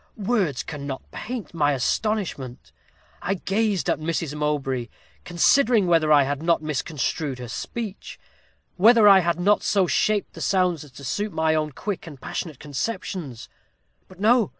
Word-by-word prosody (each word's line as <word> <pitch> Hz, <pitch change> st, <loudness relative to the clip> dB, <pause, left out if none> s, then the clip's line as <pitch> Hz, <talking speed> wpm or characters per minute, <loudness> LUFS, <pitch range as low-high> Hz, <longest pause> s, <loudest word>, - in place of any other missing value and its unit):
"Words 195 Hz, -, 0 dB
cannot 140 Hz, -4 st, -6 dB
paint 240 Hz, -5 st, -6 dB
my 145 Hz, -3 st, +2 dB
astonishment. 140 Hz, -, -2 dB, 0.5 s
I 195 Hz, -, -1 dB
gazed 200 Hz, 0 st, 0 dB
at -, -, +1 dB
Mrs. 160 Hz, -1 st, -2 dB
Mowbray, 140 Hz, -5 st, -1 dB, 0.4 s
considering 220 Hz, +5 st, +3 dB
whether 165 Hz, -3 st, +3 dB
I 145 Hz, -2 st, +7 dB
had 140 Hz, +1 st, -2 dB
not 165 Hz, -1 st, +1 dB
misconstrued 150 Hz, -1 st, -2 dB
her 125 Hz, -1 st, -7 dB
speech 210 Hz, -, -6 dB, 0.6 s
whether 220 Hz, +2 st, +6 dB
I 195 Hz, -1 st, +9 dB
had 170 Hz, -1 st, 0 dB
not 205 Hz, +4 st, +3 dB
so 195 Hz, -3 st, +2 dB
shaped 210 Hz, +3 st, 0 dB
the -, -, -9 dB
sounds 180 Hz, -5 st, +1 dB
as 150 Hz, -, -14 dB
to 140 Hz, -, -12 dB
suit 205 Hz, +9 st, -2 dB
my 160 Hz, 0 st, +2 dB
own 155 Hz, -2 st, -1 dB
quick 195 Hz, +5 st, -5 dB
and 145 Hz, -4 st, -10 dB
passionate 155 Hz, 0 st, -5 dB
conceptions. 145 Hz, -, -5 dB, 0.6 s
But 185 Hz, -1 st, -17 dB
no! 225 Hz, +1 st, +4 dB
170 Hz, 150 wpm, -24 LUFS, 145-205 Hz, 0.6 s, I